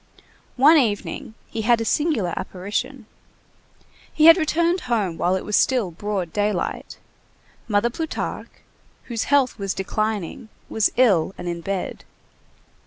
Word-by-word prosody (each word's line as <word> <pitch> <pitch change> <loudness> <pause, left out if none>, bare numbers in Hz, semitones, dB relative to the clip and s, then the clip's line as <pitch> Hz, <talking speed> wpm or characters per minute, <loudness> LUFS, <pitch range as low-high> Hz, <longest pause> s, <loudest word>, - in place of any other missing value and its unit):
One 295 +6 +7
evening 220 0 -2
he 225 - -4
had 235 +1 +3
a 225 - -2
singular 230 - 0
apparition. 205 +7 -4 1.1
He 310 - +2
had 330 0 +10
returned 340 +2 +1
home 205 -8 0
while 180 +3 +1
it 190 - -4
was 210 - 0
still 245 -9 +2
broad 190 -1 -4
daylight. 205 -2 -2 0.7
Mother 220 +2 +1
Plutarque, 320 +5 -5 0.4
whose 230 -3 -3
health 275 -5 +2
was 195 -1 -2
declining, 215 +2 -3 0.2
was 220 -2 +1
ill 195 -8 +3
and - - -7
in 170 -1 -3
bed. 195 +1 -4
215 Hz, 130 wpm, -22 LUFS, 195-255 Hz, 1.1 s, had